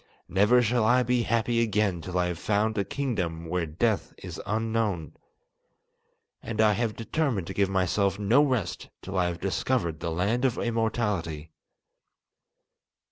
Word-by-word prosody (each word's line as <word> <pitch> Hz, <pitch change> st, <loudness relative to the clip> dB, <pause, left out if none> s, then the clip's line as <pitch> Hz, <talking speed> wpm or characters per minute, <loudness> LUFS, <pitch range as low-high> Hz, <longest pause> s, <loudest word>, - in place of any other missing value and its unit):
Never 105 Hz, +7 st, +4 dB
shall 120 Hz, 0 st, +2 dB
I 125 Hz, +3 st, +4 dB
be 125 Hz, 0 st, +1 dB
happy 115 Hz, +1 st, +1 dB
again 105 Hz, -6 st, +1 dB
till 90 Hz, +2 st, -4 dB
I 90 Hz, -, +2 dB
have 90 Hz, -2 st, -3 dB
found 110 Hz, +1 st, +1 dB
a 100 Hz, -, +1 dB
kingdom 95 Hz, -9 st, -3 dB
where 85 Hz, 0 st, -1 dB
death 100 Hz, +8 st, -1 dB
is -, -, -8 dB
unknown. 110 Hz, -6 st, -1 dB, 1.3 s
And 115 Hz, -2 st, -6 dB
I 110 Hz, -1 st, +5 dB
have 110 Hz, +1 st, -1 dB
determined 115 Hz, -, -1 dB
to -, -, -6 dB
give 100 Hz, -1 st, +1 dB
myself 95 Hz, +1 st, +1 dB
no 110 Hz, +7 st, +4 dB
rest 115 Hz, -, -2 dB
till 95 Hz, -, -6 dB
I 90 Hz, -1 st, +2 dB
have 85 Hz, 0 st, -4 dB
discovered 95 Hz, -4 st, -1 dB
the 85 Hz, -, -3 dB
Land 100 Hz, +9 st, 0 dB
of 130 Hz, -3 st, +1 dB
Immortality. 105 Hz, -9 st, -1 dB
105 Hz, 150 wpm, -27 LUFS, 90-115 Hz, 1.3 s, I